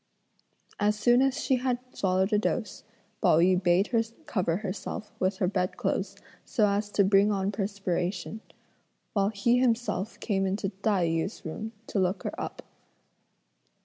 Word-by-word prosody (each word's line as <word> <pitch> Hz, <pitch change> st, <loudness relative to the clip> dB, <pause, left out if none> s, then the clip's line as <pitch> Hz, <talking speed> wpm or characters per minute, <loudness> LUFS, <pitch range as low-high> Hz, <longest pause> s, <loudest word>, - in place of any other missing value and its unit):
As 210 Hz, +1 st, +2 dB
soon 240 Hz, +4 st, +4 dB
as 270 Hz, 0 st, +2 dB
she 260 Hz, -, +2 dB
had 250 Hz, 0 st, 0 dB, 0.2 s
swallowed 190 Hz, +2 st, +1 dB
a 210 Hz, -, +4 dB
dose, 215 Hz, -1 st, -2 dB, 0.4 s
Pao 175 Hz, -6 st, +5 dB
yü 180 Hz, +2 st, +4 dB
bade 175 Hz, +2 st, +3 dB
her 230 Hz, -3 st, +3 dB, 0.2 s
cover 175 Hz, -4 st, 0 dB
herself 210 Hz, +1 st, -5 dB
with 190 Hz, +1 st, +1 dB
her 185 Hz, -, +1 dB
bed 185 Hz, -1 st, -1 dB
clothes 195 Hz, 0 st, -1 dB, 0.3 s
so 215 Hz, -, +2 dB
as 205 Hz, +1 st, 0 dB
to 200 Hz, -, +4 dB
bring 200 Hz, +2 st, +4 dB
on 195 Hz, 0 st, 0 dB
perspiration; 195 Hz, 0 st, -2 dB, 0.7 s
while 200 Hz, -1 st, +2 dB
he 230 Hz, +4 st, +2 dB
himself 230 Hz, -4 st, 0 dB
came 195 Hz, -3 st, 0 dB
into 195 Hz, +1 st, -1 dB
Tai 195 Hz, -2 st, 0 dB
yü's 165 Hz, +5 st, -2 dB
room 220 Hz, +8 st, -5 dB
to 200 Hz, -, -2 dB
look 185 Hz, +1 st, 0 dB
her -, -, -3 dB
up. -, -, -6 dB
200 Hz, 155 wpm, -28 LUFS, 185-215 Hz, 0.7 s, Pao